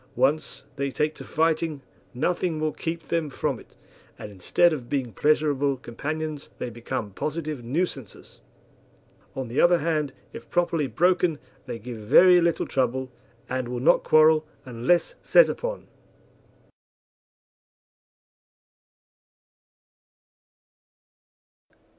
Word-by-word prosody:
Once 140 +4 0
they 140 0 -1
take 150 +3 -1
to - - -11
fighting 160 -1 0 0.3
nothing 170 +5 -1
will 155 0 0
keep 165 +1 -5
them 165 -3 0
from - - -2
it, - - -19 0.4
and 105 - -8
instead 155 - +2
of 125 -6 -6
being 130 -6 -2
pleasurable 145 0 +1
companions 150 +4 -5
they 125 - -5
become 115 -2 -5
positive 150 - -4
nuisances. 135 - -4 1.0
On 130 -2 -4
the 120 +4 0
other 175 0 +5
hand, 155 -3 -1 0.2
if - - -10
properly 170 -4 +1
broken 175 +4 +2 0.3
they - - -4
give 115 +1 -8
very 175 - +6
little 170 -1 +1
trouble, 130 0 -1 0.4
and 130 -1 -3
will 120 0 -4
not 125 - +4
quarrel 155 0 +5 0.2
unless 130 +8 +1
set - - +6
upon. - - -4
150 Hz, 110 wpm, -25 LUFS, 125-165 Hz, 1.0 s, very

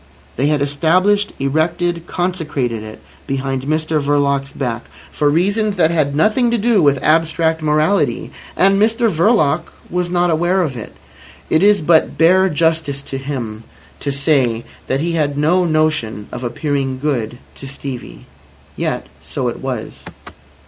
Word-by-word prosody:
They 135 +4 +1
had 150 -2 +1
established, 185 +8 +2
erected, 165 +4 -1
consecrated 155 -10 -2
it 110 0 -10 0.3
behind 135 -1 -2
Mr 155 +1 0
Verloc's 140 -1 +1
back, 120 -3 -4 0.3
for 145 -1 +1
reasons 200 +7 +1
that 165 -3 +3
had 150 -4 0
nothing 215 - +3
to 235 - +1
do 225 -2 +3
with 140 -3 +4
abstract 160 0 +2
morality. 155 +5 +1 0.3
And 195 +1 +4
Mr 225 +1 +2
Verloc 170 -2 +2 0.3
was 180 0 -1
not 175 -1 +1
aware 175 +4 +2
of 140 -6 -3
it. 115 - -8 0.6
It 160 - +4
is 205 -1 +4
but 160 0 +3
bare 185 +3 +5
justice 160 -3 0
to 135 - -5
him 120 -6 -5 0.4
to 140 - -2
say 135 -5 +1 0.2
that 135 +2 0
he 170 +2 -1
had 150 -4 0
no 175 +5 +2
notion 155 -10 0
of 120 - -6
appearing 135 +1 -2
good 125 -5 -2 0.2
to 135 - -10
Stevie. 130 - -8 0.5
Yet - - -2 0.2
so - - -3
it - - -6
was. - - -5
155 Hz, 150 wpm, -18 LUFS, 140-175 Hz, 0.6 s, bare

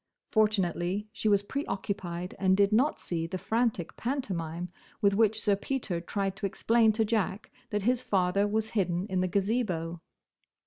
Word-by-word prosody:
Fortunately 205 -2 +1
she 220 -1 0
was 200 -1 +4
preoccupied 195 - -3
and 190 -1 +3
did 200 0 +4
not 260 +8 +3
see 165 -2 -2
the 185 +2 -3
frantic 220 -4 -1
pantomime 180 - -3 0.3
with 200 -2 +3
which 220 +1 +3
Sir 205 -2 +2
Peter 200 -5 -3
tried 195 +2 -2
to 195 - -1
explain 225 +3 +3
to 220 +1 +1
Jack 215 -2 -1 0.2
that 210 -1 -1
his 245 +2 +2
father 195 -2 +2
was 220 +1 0
hidden 180 -4 0
in 185 -1 +1
the 185 - +1
Gazebo. 185 -4 -1
200 Hz, 160 wpm, -29 LUFS, 180-220 Hz, 0.3 s, was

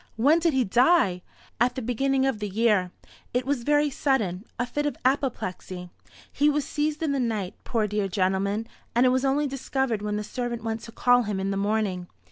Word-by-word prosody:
When 285 +9 +4
did 335 -2 +2
he 260 - +3
die?" 235 - +3 0.4
"At 245 +2 +2
the 260 - -3
beginning 265 +3 +1
of 265 -5 0
the 210 -1 -3
year. 210 -3 +2 0.5
It 250 0 +1
was 275 -2 0
very 295 +3 +2
sudden 220 -9 0
a 245 - 0
fit 295 +4 -2
of 290 - -3
apoplexy. 185 -9 -2 0.4
He 295 +1 +3
was 295 -1 0
seized 300 +1 -2
in 310 - +1
the 280 - 0
night, 215 -6 -1
poor 225 -3 0
dear 210 -1 -1
gentleman, 195 +3 0 0.3
and 240 +2 +5
it - - +6
was 255 +1 +1
only 280 +2 +2
discovered 265 -4 -1
when 210 0 -2
the 210 - -2
servant 240 +1 -4
went 225 -1 -3
to 230 - -10
call 245 +1 +4
him 205 -4 -2
in 195 +1 -1
the - - -1
morning. 200 -3 -1
235 Hz, 205 wpm, -26 LUFS, 205-270 Hz, 0.5 s, it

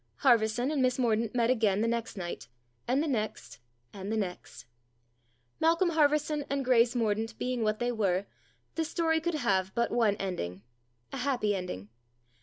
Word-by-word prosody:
Harverson 240 +2 +3
and 295 -3 0
Miss 255 -1 +2
Mordaunt 230 -2 +1
met 235 0 +3
again 215 -5 +2
the 230 - +2
next 230 -2 -2
night, 175 -2 -5 0.4
and 265 +5 +2
the - - -2
next, 215 -6 -3 0.3
and 195 +1 -6
the 220 - 0
next. 180 - -5 0.9
Malcolm 335 +3 +3
Harverson 300 -1 +2
and 275 -1 -1
Grace 240 -1 +4
Mordaunt 225 -1 -1
being 250 -1 -2
what 215 -1 +1
they 240 +1 0
were, 200 -4 0 0.5
the 325 - -1
story 320 0 0
could 345 0 -1
have 190 -9 +1
but 235 0 +1
one 220 -4 +3
ending 100 - -4 0.5
a - - -3
happy 245 -6 0
ending. 145 - -5
235 Hz, 165 wpm, -30 LUFS, 205-270 Hz, 0.9 s, Grace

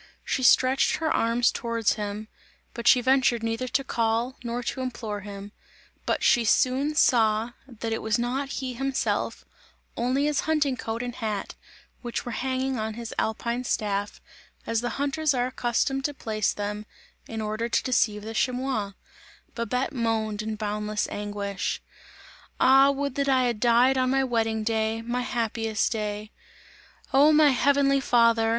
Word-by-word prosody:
She 260 - -1
stretched 260 +1 +4
her 315 -1 -1
arms 235 +2 +2
towards 230 -2 0
him, 210 0 -5 0.5
but 235 -1 -4
she 250 - +7
ventured 255 -2 +2
neither 225 +3 -2
to 275 +2 0
call, 230 +1 0
nor 240 +1 -3
to 260 - -3
implore 225 -5 -4
him; 200 0 -9 0.6
but - - 0
she 240 - +4
soon 265 +6 +2
saw 225 -4 +3 0.2
that 230 -3 -5
it 225 - -3
was 220 +1 0
not 255 +4 -2
he 260 -1 -4
himself, 270 +2 -2 0.5
only 255 +4 0
his 300 -1 +1
hunting 295 -4 +2
coat 230 -1 -4
and 245 0 -4
hat, 215 -4 -4 0.5
which 240 -2 -4
were 240 - -4
hanging 260 +1 -2
on 220 0 -3
his 235 -1 -6
alpine 235 +2 -1
staff, 205 -4 -2 0.5
as 230 0 0
the 245 - -3
hunters 285 +1 0
are 245 -1 +1
accustomed 255 +2 -1
to 290 - -2
place 215 -5 -1
them, 210 +1 -5 0.4
in 225 - -5
order 215 +2 -2
to - - +1
deceive 215 -4 +1
the 220 +1 -6
chamois! 250 -4 -1 0.6
Babette 250 +4 -2
moaned 220 -3 -1
in 215 0 -3
boundless 210 0 -2
anguish: 205 -1 -3 0.8
"Ah! 270 +1 +6
would 280 -1 -1
that 280 +1 0
I 260 -1 +4
had 240 -3 -1
died 245 +3 +4
on 255 0 +2
my 270 +1 +2
wedding 225 -3 0
day, 220 0 -1
my 240 +2 -2
happiest 225 -3 -1
day! 210 -1 -4 0.8
Oh! 285 +3 +6
my 305 -1 +6
heavenly 275 +1 +3
Father! 230 -3 +3
235 Hz, 155 wpm, -26 LUFS, 220-260 Hz, 0.8 s, she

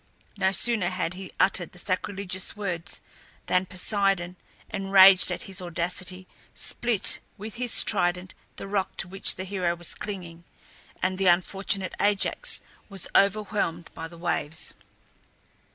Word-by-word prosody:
No 190 - +2
sooner 205 -1 +2
had 185 -2 -2
he 190 0 -9
uttered 185 -3 +2
the - - -14
sacrilegious 185 0 -3
words 180 -5 -3 0.4
than 180 +1 +1
Poseidon, 185 -1 +1 0.4
enraged 195 -1 +6
at - - -3
his 195 -1 -7
audacity, 180 +2 -2 0.3
split 235 -5 +1 0.2
with 215 +2 -8
his 245 -1 +3
trident 180 -2 0 0.2
the - - -7
rock 195 -1 -2
to - - +1
which 195 +2 +2
the 185 - -5
hero 180 -3 -1
was 175 0 -4
clinging, 175 -5 -7 0.6
and 185 0 0
the 195 - +2
unfortunate 190 +2 +1
Ajax 205 - +2 0.3
was 195 -3 -4
overwhelmed 200 -4 +1
by 165 - -6
the 170 +1 -13
waves. 160 -2 -2
185 Hz, 135 wpm, -26 LUFS, 175-200 Hz, 0.6 s, enraged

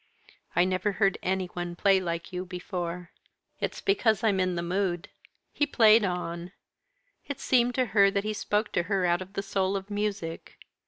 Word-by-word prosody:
"I 175 - +5
never 185 +2 0
heard 195 -1 +1
any 190 0 0
one 175 -1 -5
play 195 +1 +4
like 170 -1 -4
you 180 0 -3
before." 180 -1 -5 0.5
"It's - - -3
because 230 - +2
I'm 205 -4 +2
in 185 -1 +1
the 170 - -2
mood." 175 -1 -1 0.4
He 290 - +1
played 220 -4 +6
on. 175 -1 -3 0.7
It 285 - -5
seemed 245 -1 +2
to 255 - +2
her 200 -2 +6
that 200 0 -1
he 215 0 -2
spoke 210 +1 -1
to - - +1
her 195 -3 +2
out 175 +1 +2
of 185 +1 -9
the 195 - -3
soul 195 0 0
of 195 +1 -5
music. 205 -5 -3
190 Hz, 180 wpm, -28 LUFS, 180-210 Hz, 0.7 s, played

